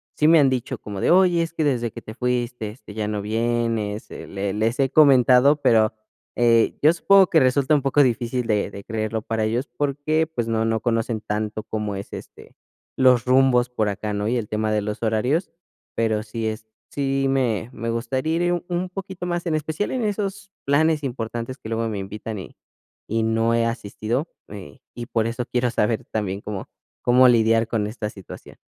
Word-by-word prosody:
sí 150 - +3
me 165 0 +7
han 140 -2 +5
dicho 130 0 -2
como 100 -2 -7
de: - - +2
"Oye, 180 -1 +5
es 165 0 -3
que 160 - -1
desde 120 -6 0
que - - -9
te 110 - -9
fuiste, 120 -2 -2
este, 105 -1 -12
ya 105 -1 -3
no 105 -1 -2
vienes", 115 -1 -1
eh, - - -8
le 100 0 -3
les 110 +3 0
he 135 - +3
comentado, 135 -1 +6
pero, 110 -2 +4 0.4
eh, 115 -1 +3
yo 155 - +7
supongo 195 +2 +5
que 160 - +4
resulta 135 +2 +2
un 145 - +3
poco 140 +2 +3
difícil 120 0 -1
de 105 -3 0
de 100 0 -10
creerlo 110 0 -3
para 110 -1 -1
ellos, 120 +6 -1
porque, 145 +3 0
pues, 120 -8 -3
no 115 -1 0
no 115 0 0
conocen 115 -2 -1
tanto 105 0 -3
cómo 105 -2 -4
es, 95 - -8
este, - - -11 0.4
los 125 -2 +5
rumbos 130 -1 +4
por 110 -4 -1
acá, 105 +1 -4
¿no? 105 +1 -2
Y 120 - +1
el 110 -3 -4
tema 110 0 -1
de 105 -1 +1
los 105 +1 -5
horarios, 125 - 0 0.5
pero 110 -2 +1
sí 115 0 -5
es, 110 0 -5 0.2
sí 135 -1 -1
me 120 -5 0
me 115 -2 -5
gustaría 130 +7 -1
ir 175 -1 0
un 180 +1 -2
poquito 190 -1 -6
más, 175 0 -2
en 160 -2 0
especial 155 +6 -2
en 255 -2 -1
esos 200 -1 -3
planes 150 +2 +2
importantes 120 0 -4
que 110 - -9
luego 115 0 -1
me 105 -3 -3
invitan 105 +2 -6
y 95 - -11 0.5
y 115 +1 0
no 115 +1 +1
he 115 - +2
asistido, 115 +4 -3 0.2
eh, 95 -8 -10
y 120 - -6
por 115 -2 -1
eso 120 +1 -3
quiero 125 -1 0
saber 110 -1 0
también 100 -2 -2
cómo 105 -3 -6 0.3
cómo 125 +1 +5
lidiar 115 -1 +3
con 105 -3 -1
esta 105 -1 -5
situación. 95 -3 -12
115 Hz, 200 wpm, -23 LUFS, 110-135 Hz, 0.5 s, me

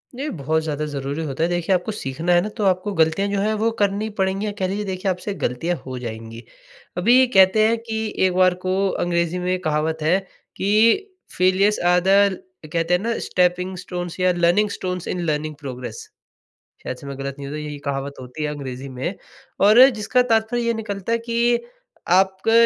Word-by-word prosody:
ये 285 +4 -3
बहुत 160 0 -1
ज़्यादा 150 -1 -2
ज़रूरी 140 +2 -4
होता 140 +2 -2
है। 170 - +1
देखिए 175 +2 0
आपको 180 +4 -2
सीखना 165 -2 -3
है 175 - +5
ना 210 - -3
तो 210 - -1
आपको 185 +2 +1
गलतियाँ 165 +3 +2
जो 200 -1 -1
है 215 +2 +1
वो 225 - +3
करनी 205 +2 +1
पड़ेंगी 190 +2 0
या 210 - -2
कह 190 - +1
लीजिए 205 +2 -3
देखिए 190 0 -2
आपसे 185 +3 -4
गलतियाँ 165 +1 -2
हो 130 -1 -5
जाएँगी। 115 0 -7 0.5
अभी 245 +8 +5
कहते 200 0 +5
हैं 230 +1 +2
कि 220 0 -2 0.3
एक 185 - +1
बार 185 0 +4
को 190 +1 +1
अंग्रेजी 170 0 0
में 180 +1 0
कहावत 155 0 -1
है 165 +5 +3 0.4
कि 220 - +3 0.3
फ़ेलियर्स 185 +3 +3
आर 180 0 +5
द 200 -1 +4 0.4
कहते 165 +1 +1
हैं 180 - +3
ना 230 +2 -1
स्टेपिंग 180 +1 0
स्टोन्स 175 0 -6
या 185 0 +3
learning 175 +5 +2
stones 180 -3 -4
in 180 - -2
learning 155 0 -2
progress. 130 -3 -7 0.7
शायद 130 - -5
से 140 - -12
मैं 140 -1 -7
गलत 140 0 -4
नहीं 140 - -6
हूँ 145 - -6
तो - - -4
यही 150 -1 -6
कहावत 140 0 -3
होती 125 +4 -8
है 150 - 0
अंग्रेज़ी 135 -1 -7
में। 130 +8 -4 0.5
और 225 +7 +8
जिसका 245 +1 +1
तात्पर्य 230 0 +1
ये 235 0 +1
निकलता 210 -1 -4
है 230 - +2
कि 235 +1 +1 0.6
आपका 190 +3 +2
180 Hz, 195 wpm, -22 LUFS, 155-205 Hz, 0.7 s, और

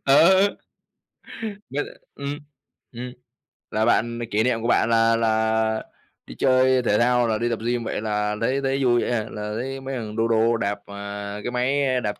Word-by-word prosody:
Ờ. 185 +8 +6 1.2
Bớt 140 +3 -1 0.3
ừm, 140 +1 -4 0.5
ừm, 125 0 -7 0.6
là 110 +1 +1
bạn 115 0 +2
m - - -5
kỷ 110 +2 +2
niệm 120 -2 +1
của 115 - -2
bạn 115 - +3
là 115 0 +4
là 110 -1 +1 0.4
đi - - -9
chơi 130 -1 +4
thể 105 -3 +2
thao, 120 0 +3
là 110 -1 +1
đi 120 +2 -1
tập 115 - -2
gym 120 -1 0
vậy 110 - -3
là 105 -1 -1
thấy 130 +4 +1
thấy 135 0 0
vui 120 -1 +4
vậy - - -1
hả? 110 -3 0
Là 105 0 -5
thấy 135 +1 -4
mấy 135 0 -5
thằng 110 -3 -5
đô 115 0 +1
đô 115 +1 +3
đạp, 100 -1 -2
à, 100 0 -6
cái 120 - -3
máy 130 +1 +1
đạp 105 -2 -3
115 Hz, 190 wpm, -23 LUFS, 110-130 Hz, 1.2 s, Ờ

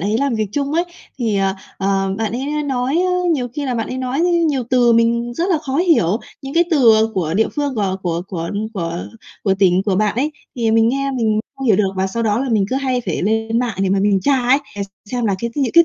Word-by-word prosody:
ấy 210 +5 0
làm 275 -4 0
việc 215 -1 0
chung 280 +1 -1
ấy 340 +3 +2 0.3
thì, 225 -4 0
ờ, 195 0 +1 0.2
ờ, 195 0 0
bạn 220 -1 -1
ấy 290 +4 -2
nói 265 -1 -1
á, 365 +1 +2 0.2
nhiều 250 -5 -1
khi 290 - -3
là 255 -2 -1
bạn 225 -2 -2
ấy 255 - -4
nói 260 +2 -2
á, 340 - +3 0.2
nhiều 270 -4 0
từ 245 -2 +4
mình 235 +1 +2
rất 345 +7 -1
là 340 - +3
khó 275 -3 -4
hiểu. 310 - +3 0.2
Những 270 +1 -6
cái 345 +1 +4
từ, 250 -8 +6
à, - - +3
của 165 -3 -1
địa 220 +2 +2
phương 290 -3 -2
g - - -9
của 195 -2 0
của 170 -1 -1
của 170 -3 -4 0.2
của 165 -3 -3 0.5
của 195 -2 +3
tỉnh 185 -1 +4
của 195 -3 +1
bạn 210 0 +1
ấy, 290 +5 0 0.2
thì 230 -2 +1
mình 225 0 +4
nghe 275 +2 0
mình 220 -5 +1 0.2
không 270 - -4
hiểu 215 -5 +5
được 200 -1 +2
và 190 0 +1
sau 230 +5 -3
đó 215 -1 +1
là 270 - -2
mình 215 -4 +2
cứ 260 - +1
hay 260 -2 0
phải 175 - -2
lên 225 +3 0
mạng 245 -4 -2
để 195 - +1
mà 195 - +2
mình 200 -1 +2
tra 280 +3 +2
ấy, 255 +3 +3 0.2
để 200 - -2 0.3
xem 245 -2 -1
là 200 -3 +1
cái 235 +3 -3
những 270 -5 0
cái 335 0 +7
235 Hz, 270 wpm, -19 LUFS, 200-270 Hz, 0.5 s, cái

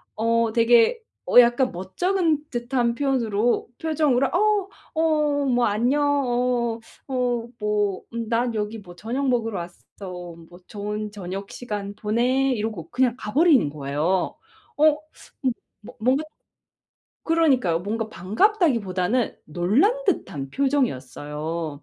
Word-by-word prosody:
어 230 0 +1
되게 235 - +4 0.2
어 245 - +7
약간 245 +2 +4
멋쩍은 305 - -1
듯한 240 -1 -1
표현으로 240 -5 0
표정으로 300 -5 +2
어 420 -2 +2 0.3
어 300 -3 +2
뭐 245 -2 +2
"안녕, 240 +8 +1 0.2
어 240 -1 0 0.3
어 245 -3 -1
뭐 210 -2 0
음 230 -1 -4
난 235 0 0
여기 215 +1 -3
뭐 175 -3 -13
저녁 250 +8 -3
먹으러 225 -6 0
왔어. 175 +1 -7 0.7
뭐 175 +1 -14
좋은 210 0 -4
저녁 195 0 -6
시간 205 -4 -5
보내." 250 +5 +1
이러고 210 -7 -4
그냥 250 -2 +1
가버린 265 - +3
거예요. 150 +5 -1 0.4
어? 305 0 +5 0.8
뭐 245 +4 -12
뭔가 260 +6 +2 1.0
그러니까요. 265 - +2
뭔가 220 +3 -3
반갑다기보다는 230 - +1
놀란 255 - +2
듯한 160 - -1
표정이었어요. 155 - -2
235 Hz, 240 characters per minute, -24 LUFS, 200-270 Hz, 1.0 s, 어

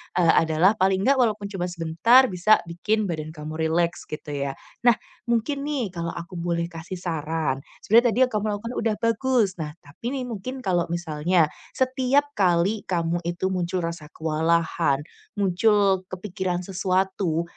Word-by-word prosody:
eee, 175 -2 +5 0.2
adalah 160 +5 +4
paling 190 0 +2
gak 270 +3 +3
walaupun 210 -4 +1
cuma 180 -3 -2
sebentar 175 +9 +4
bisa 190 +4 +4
bikin 180 +6 -1
badan 155 -4 -4
kamu 155 +1 -7
rileks 170 +1 0
gitu 150 -1 -7
ya. 140 -1 -3 0.3
Nah, 235 - +7 0.3
mungkin 275 +5 0
nih 260 -10 -2
kalau 170 -1 -4
aku 170 +1 -7
boleh 170 0 -1
kasih 165 +3 -7
saran, 160 -5 -2 0.2
sebenarnya 230 +4 +5
tadi - - 0
yang 255 - +1
kamu 210 0 -1
lakukan 230 +4 -6
udah 225 -2 0
bagus. 230 -1 +2
Nah, 150 -1 -5
tapi 145 +10 -15
nih 260 - -2
mungkin 255 +5 -6
kalau 175 -3 +1
misalnya, 165 -1 +1 0.2
setiap 260 +2 +1
kali 185 +3 +2
kamu 170 -1 0
itu 175 +2 -1
muncul 180 -1 -1
rasa 165 -2 -5
kewalahan, 160 -2 0 0.3
muncul 195 -1 +2
kepikiran 185 -1 -3
sesuatu, 185 -2 0
180 Hz, 155 wpm, -24 LUFS, 165-215 Hz, 0.3 s, Nah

